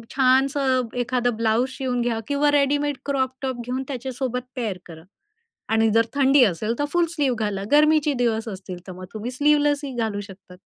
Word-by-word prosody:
छानसं 265 Hz, -1 st, +2 dB
एखादं 245 Hz, -1 st, 0 dB
ब्लाउज 230 Hz, +3 st, +1 dB
शिवून 255 Hz, -2 st, -2 dB
घ्या 235 Hz, -2 st, -1 dB
किंवा 290 Hz, +1 st, +2 dB
रेडीमेड 290 Hz, 0 st, +1 dB
क्रॉप 265 Hz, -2 st, 0 dB
टॉप 260 Hz, -2 st, -3 dB
घेऊन 255 Hz, +2 st, -3 dB
त्याच्यासोबत 255 Hz, -1 st, -3 dB
पेअर 220 Hz, -7 st, -3 dB
करा 160 Hz, -2 st, -12 dB, 0.7 s
आणि 225 Hz, 0 st, +3 dB
जर 225 Hz, +1 st, +3 dB
थंडी 275 Hz, -1 st, +5 dB
असेल 215 Hz, +3 st, 0 dB
तर 290 Hz, -, +1 dB
फुल 350 Hz, -1 st, +3 dB
स्लीव 280 Hz, -4 st, +1 dB
घाला. 205 Hz, -3 st, -2 dB
गर्मीचे 300 Hz, 0 st, +4 dB
दिवस 225 Hz, -1 st, 0 dB
असतील 190 Hz, -3 st, -7 dB
तर -, -, -6 dB
मग 185 Hz, 0 st, -9 dB
तुम्ही 225 Hz, +3 st, -5 dB
स्लीव्हलेसही 290 Hz, -1 st, +1 dB
घालू 220 Hz, -3 st, -1 dB
शकतात. 195 Hz, -2 st, -13 dB
255 Hz, 170 wpm, -23 LUFS, 225-280 Hz, 0.7 s, थंडी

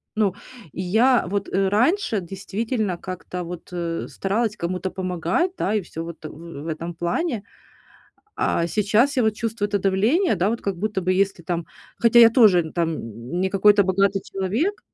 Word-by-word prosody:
Ну, 210 Hz, -4 st, +2 dB, 0.4 s
и 180 Hz, -, -5 dB
я 230 Hz, +7 st, +3 dB
вот, 200 Hz, +2 st, -2 dB
э, 195 Hz, 0 st, +1 dB
раньше 240 Hz, -, +2 dB
действительно 200 Hz, +2 st, -3 dB
как-то 180 Hz, 0 st, -6 dB
вот, 175 Hz, 0 st, -8 dB
э, 170 Hz, -2 st, -3 dB
старалась 215 Hz, +2 st, -1 dB
кому-то 180 Hz, +2 st, -3 dB
помогать, 185 Hz, -, -1 dB
да, 205 Hz, -, 0 dB
и 210 Hz, -, +1 dB
всё 165 Hz, -2 st, -7 dB
вот, 165 Hz, -1 st, -9 dB
э, -, -, -5 dB
в 165 Hz, -1 st, -9 dB
этом 165 Hz, +2 st, -5 dB
плане. 200 Hz, -, -2 dB, 0.9 s
А 170 Hz, -, 0 dB
сейчас 215 Hz, -, +2 dB
я 250 Hz, -, +3 dB
вот 220 Hz, -1 st, +2 dB
чувствую 225 Hz, -2 st, -2 dB
это 205 Hz, 0 st, 0 dB
давление, 215 Hz, -, +2 dB
да, 185 Hz, +3 st, +1 dB
вот 230 Hz, +2 st, -2 dB
как 195 Hz, -2 st, -2 dB
будто 210 Hz, 0 st, -1 dB
бы 185 Hz, +1 st, +1 dB
если 195 Hz, -1 st, 0 dB
там 170 Hz, 0 st, -3 dB, 0.3 s
хотя 235 Hz, 0 st, +6 dB
я 230 Hz, -1 st, +9 dB
тоже 195 Hz, -, +5 dB
там 155 Hz, -4 st, -3 dB
не 190 Hz, -, +1 dB
какой-то 205 Hz, +1 st, +5 dB
богатый 195 Hz, +1 st, +1 dB
человек. 220 Hz, -, -2 dB
195 Hz, 175 wpm, -23 LUFS, 175-220 Hz, 0.9 s, я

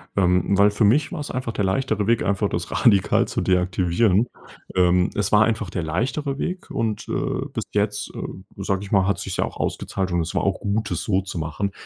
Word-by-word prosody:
Ähm, 90 Hz, 0 st, +2 dB
weil 100 Hz, +1 st, +5 dB
für 105 Hz, +2 st, 0 dB
mich 140 Hz, -, +3 dB
war's 150 Hz, -5 st, -5 dB
einfach 125 Hz, -2 st, -3 dB
der 105 Hz, -3 st, -1 dB
leichtere 105 Hz, +1 st, 0 dB
Weg, 115 Hz, -1 st, +2 dB
einfach 100 Hz, +1 st, 0 dB
das 85 Hz, 0 st, -4 dB
radikal 100 Hz, -6 st, +3 dB
zu -, -, -2 dB
deaktivieren. 90 Hz, +4 st, +2 dB, 0.5 s
Ähm, 90 Hz, 0 st, +4 dB
es 100 Hz, -1 st, 0 dB
war 105 Hz, 0 st, +6 dB
einfach 110 Hz, -3 st, -1 dB
der 85 Hz, -, -3 dB
leichtere 135 Hz, -, -2 dB
Weg. 180 Hz, +1 st, -4 dB
Und, 110 Hz, -2 st, -2 dB
äh, -, -, -1 dB
bis -, -, -2 dB
jetzt, 105 Hz, 0 st, -1 dB
äh, 95 Hz, +1 st, -8 dB
sage 95 Hz, 0 st, -1 dB
ich 100 Hz, -, -9 dB
mal, 95 Hz, -2 st, +3 dB
hat 100 Hz, -, 0 dB
sich's -, -, -4 dB
ja -, -, +2 dB
auch -, -, -8 dB
ausgezahlt. 95 Hz, -2 st, -2 dB
Und 85 Hz, -1 st, +1 dB
es 80 Hz, -, -4 dB
war -, -, +1 dB
auch 100 Hz, -, 0 dB
gut, 105 Hz, +2 st, -1 dB
das -, -, -1 dB
so 95 Hz, -2 st, +1 dB
zu 95 Hz, -2 st, -7 dB
machen, 85 Hz, +6 st, -2 dB
100 Hz, 220 wpm, -23 LUFS, 90-110 Hz, 0.5 s, war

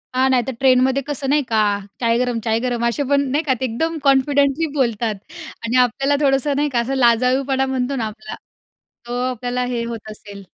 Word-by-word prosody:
हां, 260 Hz, +1 st, +3 dB
नाहीतर 260 Hz, 0 st, +1 dB
ट्रेनमध्ये 260 Hz, 0 st, +3 dB
कसं 280 Hz, -2 st, -3 dB
नाही 290 Hz, 0 st, +3 dB
का, 220 Hz, -, +2 dB, 0.4 s
चाय 230 Hz, -1 st, +2 dB
गरम-चाय 230 Hz, -2 st, 0 dB
गरम, 240 Hz, -1 st, -1 dB
असे 260 Hz, +5 st, -1 dB
पण 280 Hz, 0 st, +3 dB
नाही 300 Hz, +3 st, +1 dB
का, 270 Hz, -, +1 dB
ते 260 Hz, -, -1 dB
एकदम 320 Hz, +8 st, -2 dB
कॉन्फिडेंटली 280 Hz, +2 st, +3 dB
बोलतात 235 Hz, -5 st, 0 dB, 0.5 s
आणि 235 Hz, +2 st, +1 dB
आपल्याला 270 Hz, +4 st, 0 dB
थोडंसं 275 Hz, +1 st, +2 dB
नाही 295 Hz, +1 st, +1 dB
का, 250 Hz, -3 st, 0 dB
असं 240 Hz, +3 st, -2 dB
लजाळूपणा 260 Hz, +2 st, +2 dB
म्हणतो 265 Hz, 0 st, -2 dB
ना 235 Hz, -4 st, -2 dB
आपला 215 Hz, +1 st, -8 dB, 0.7 s
तो 245 Hz, +1 st, -3 dB
आपल्याला 250 Hz, +1 st, -3 dB
हे 245 Hz, -1 st, -2 dB
होत 230 Hz, -2 st, -7 dB
असेल. 205 Hz, -2 st, -11 dB
255 Hz, 180 wpm, -20 LUFS, 235-275 Hz, 0.7 s, हां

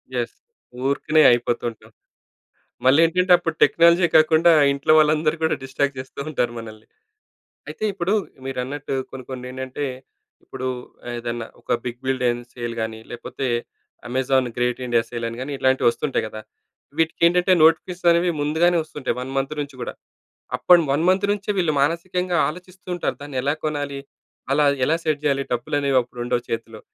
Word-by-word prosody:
Yes! -, -, -2 dB, 0.5 s
ఊరుకనే 155 Hz, +3 st, +2 dB
అయిపోతుంటాం. 120 Hz, -2 st, -2 dB, 0.9 s
మళ్ళేంటంటే 165 Hz, +7 st, +4 dB
అప్పుడు 165 Hz, -2 st, -3 dB
టెక్నాలజే 170 Hz, +1 st, +5 dB
కాకుండా 160 Hz, +2 st, +5 dB, 0.2 s
ఇంట్లో 140 Hz, +2 st, +1 dB
వాళ్ళందరూ 155 Hz, 0 st, +3 dB
కూడా 160 Hz, -, +2 dB
డిస్ట్రాక్ట్ 135 Hz, +1 st, -1 dB
జేస్తూ 130 Hz, +1 st, -9 dB
ఉంటారు 125 Hz, -5 st, 0 dB
మనల్ని. 110 Hz, -1 st, -10 dB, 0.8 s
అయితే -, -, -9 dB
ఇప్పుడు 185 Hz, 0 st, -1 dB, 0.3 s
మీరన్నట్టు 135 Hz, +2 st, -4 dB, 0.2 s
కొన్ని 130 Hz, -1 st, -8 dB
కొన్నేంటంటే 130 Hz, +2 st, -5 dB, 0.6 s
ఇప్పుడు 130 Hz, -, -6 dB, 0.5 s
ఏదన్నా 120 Hz, -1 st, -4 dB
ఒక -, -, -3 dB
బిగ్ 120 Hz, 0 st, -5 dB
బిలియన్ 125 Hz, -2 st, 0 dB
సేల్ 120 Hz, -1 st, -5 dB
గానీ 110 Hz, 0 st, -4 dB
లేపోతే 120 Hz, +3 st, -5 dB, 0.6 s
అమెజాన్ 130 Hz, +1 st, +1 dB
గ్రేట్ 125 Hz, 0 st, 0 dB
ఇండియా 120 Hz, -1 st, +2 dB
సేల్ 120 Hz, -1 st, -4 dB
అని 115 Hz, +1 st, -7 dB
గాని 135 Hz, +3 st, -4 dB
ఇట్లాంటివొస్తుంటాయి 130 Hz, +1 st, +1 dB
గదా! 110 Hz, 0 st, -8 dB, 0.6 s
వీటికేంటంటే 170 Hz, +3 st, +3 dB
నోటిఫికేషన్స్ 175 Hz, +2 st, +3 dB
అనేవి 170 Hz, +1 st, +3 dB
ముందుగానే 160 Hz, +4 st, +2 dB
వస్తుంటాయి 145 Hz, -5 st, -4 dB
1 130 Hz, +1 st, -6 dB
మంత్ 135 Hz, +1 st, -1 dB
నుంచి 145 Hz, -1 st, -6 dB
గూడా. -, -, -4 dB, 0.6 s
అప్పున్ 175 Hz, -2 st, +5 dB
1 145 Hz, +4 st, +1 dB
మంత్ 190 Hz, +2 st, +3 dB
నుంచే 205 Hz, 0 st, -3 dB
వీళ్ళు 170 Hz, -5 st, +2 dB
మానసికంగా 175 Hz, +3 st, 0 dB
ఆలోచిస్తూంటారు 180 Hz, +1 st, -5 dB
దాన్ని 145 Hz, -2 st, -6 dB
ఎలా 140 Hz, +3 st, +1 dB
కొనాలి? 145 Hz, -2 st, -3 dB, 0.5 s
అలా 145 Hz, +2 st, +3 dB, 0.2 s
ఎలా 160 Hz, -, +2 dB
సెట్ 155 Hz, -2 st, 0 dB
జేయాలి? 140 Hz, -2 st, +1 dB
డబ్బులనేవి 140 Hz, +3 st, 0 dB
అప్పుడుండవు 120 Hz, 0 st, -3 dB
చేతిలో. 115 Hz, -1 st, -5 dB
140 Hz, 135 wpm, -22 LUFS, 125-165 Hz, 0.9 s, టెక్నాలజే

